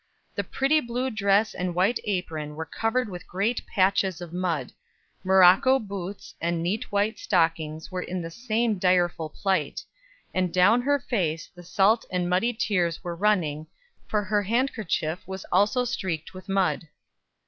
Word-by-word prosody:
The -, -, -2 dB
pretty 275 Hz, +4 st, +2 dB
blue 250 Hz, 0 st, -2 dB
dress 205 Hz, 0 st, +2 dB
and 180 Hz, -1 st, -3 dB
white 195 Hz, +7 st, +2 dB
apron 160 Hz, -7 st, -3 dB
were 160 Hz, +1 st, -4 dB
covered 225 Hz, +8 st, -1 dB
with 180 Hz, -3 st, -8 dB
great 205 Hz, +6 st, -1 dB
patches 190 Hz, -2 st, +2 dB
of 175 Hz, -2 st, -8 dB
mud; 170 Hz, -8 st, -2 dB, 0.5 s
morocco 190 Hz, +7 st, +6 dB
boots 200 Hz, -4 st, -7 dB
and 170 Hz, 0 st, -1 dB
neat 195 Hz, +6 st, -2 dB
white 205 Hz, +2 st, 0 dB
stockings 160 Hz, -3 st, 0 dB
were 185 Hz, 0 st, -3 dB
in 180 Hz, -1 st, -4 dB
the 165 Hz, -, -6 dB
same 230 Hz, 0 st, -1 dB
direful 175 Hz, -3 st, +2 dB
plight; 185 Hz, -3 st, -1 dB, 0.5 s
and 185 Hz, -2 st, 0 dB
down 200 Hz, +7 st, +4 dB
her 285 Hz, +3 st, +2 dB
face 180 Hz, -, -2 dB
the 175 Hz, -, -12 dB
salt 200 Hz, +5 st, +2 dB
and 180 Hz, -1 st, -1 dB
muddy 185 Hz, +7 st, +2 dB
tears 180 Hz, -7 st, -1 dB
were 175 Hz, -1 st, -4 dB
running, 165 Hz, -6 st, +1 dB, 0.4 s
for 210 Hz, -1 st, 0 dB
her 205 Hz, +1 st, +1 dB
handkerchief 210 Hz, -, -1 dB
was 190 Hz, 0 st, -6 dB
also 205 Hz, +7 st, +3 dB
streaked 180 Hz, -10 st, -3 dB
with 185 Hz, +1 st, -11 dB
mud. 195 Hz, -4 st, +1 dB
190 Hz, 155 wpm, -26 LUFS, 175-215 Hz, 0.5 s, morocco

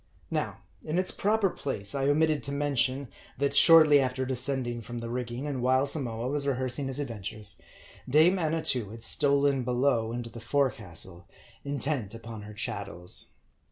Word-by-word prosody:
Now, -, -, -2 dB, 0.2 s
in 155 Hz, +2 st, -2 dB
its 185 Hz, 0 st, +2 dB
proper 210 Hz, 0 st, +1 dB
place, 100 Hz, -8 st, -3 dB
I 135 Hz, 0 st, 0 dB
omitted 155 Hz, 0 st, +2 dB
to 140 Hz, -, -4 dB
mention, 140 Hz, -1 st, 0 dB, 0.3 s
that 140 Hz, +1 st, 0 dB
shortly 155 Hz, -3 st, +8 dB
after 130 Hz, 0 st, -1 dB
descending 125 Hz, -2 st, -1 dB
from 120 Hz, +2 st, -7 dB
the 115 Hz, 0 st, -5 dB
rigging, 125 Hz, +2 st, -4 dB
and 140 Hz, -4 st, -3 dB
while 130 Hz, +2 st, +3 dB
Samoa 125 Hz, -5 st, -2 dB
was 140 Hz, +1 st, 0 dB
rehearsing 130 Hz, +1 st, 0 dB
his 135 Hz, 0 st, -2 dB
adventures, 110 Hz, -6 st, -5 dB, 0.5 s
dame 160 Hz, +7 st, +5 dB
Annatoo 155 Hz, -, 0 dB
had 115 Hz, +1 st, -7 dB
stolen 140 Hz, -2 st, +2 dB
below 120 Hz, -2 st, +1 dB
into 120 Hz, -1 st, -5 dB
the 115 Hz, -, -9 dB
forecastle, 105 Hz, -, -1 dB, 0.4 s
intent 140 Hz, -6 st, -2 dB
upon 115 Hz, -1 st, -8 dB
her 105 Hz, +1 st, -10 dB
chattels. 100 Hz, -4 st, -4 dB
130 Hz, 155 wpm, -28 LUFS, 115-145 Hz, 0.5 s, shortly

